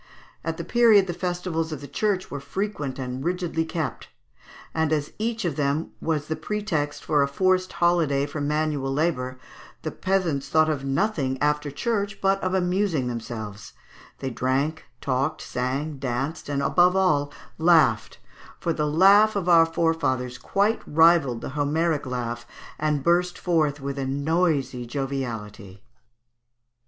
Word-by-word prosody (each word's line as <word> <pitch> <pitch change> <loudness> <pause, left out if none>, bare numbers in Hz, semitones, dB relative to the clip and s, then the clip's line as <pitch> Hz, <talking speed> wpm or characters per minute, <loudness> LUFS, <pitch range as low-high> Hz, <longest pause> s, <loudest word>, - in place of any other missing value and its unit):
At - - -3
that - - -6
period 225 -5 +5
the 175 - -3
festivals 175 -2 -2
of 155 - -4
the 140 - -9
Church 195 +4 -1
were 145 - -4
frequent 150 -4 -4
and 130 0 -4
rigidly 175 -1 -1
kept, 155 -7 -4 0.7
and 160 -1 0
as 150 -1 -1
each 225 -1 -2
of 160 -5 -2
them 145 +2 0
was 155 -3 -1
the 160 - -1
pretext 155 -4 -3
for 150 -2 +2
a 140 - +3
forced 185 +5 +1
holiday 165 -5 +2
from 145 0 -4
manual 150 -3 0
labour, 135 -4 -1 0.5
the - - -3
peasants 180 -7 -1
thought 155 0 +4
of 140 -3 -3
nothing, 135 -2 0
after 150 0 +1
church, 200 +6 -2
but 195 0 +2
of 185 0 0
amusing 180 -5 +1
themselves; 110 -4 -6 0.4
they 135 -1 -4
drank, 135 +6 -1 0.2
talked, 140 +3 -1
sang, 135 +4 -3
danced, 135 +4 -3
and, 140 -1 -1
above 180 +4 +4
all, 150 -7 +2 0.3
laughed, 160 -9 +3 0.4
for 165 - -1
the 150 -1 -1
laugh 200 +7 +5
of 190 -3 -2
our 165 -2 +6
forefathers 130 -7 0
quite 200 - +1
rivalled 160 -6 +4
the - - -5
Homeric 150 +1 0
laugh, 120 -2 -4 0.3
and 150 -2 0
burst 175 +2 +2
forth 155 -5 +1
with 140 0 -4
a 135 - -2
noisy 140 -3 0
joviality 115 -7 -4
(Fig. 95 - -24
150 Hz, 150 wpm, -25 LUFS, 135-175 Hz, 0.7 s, our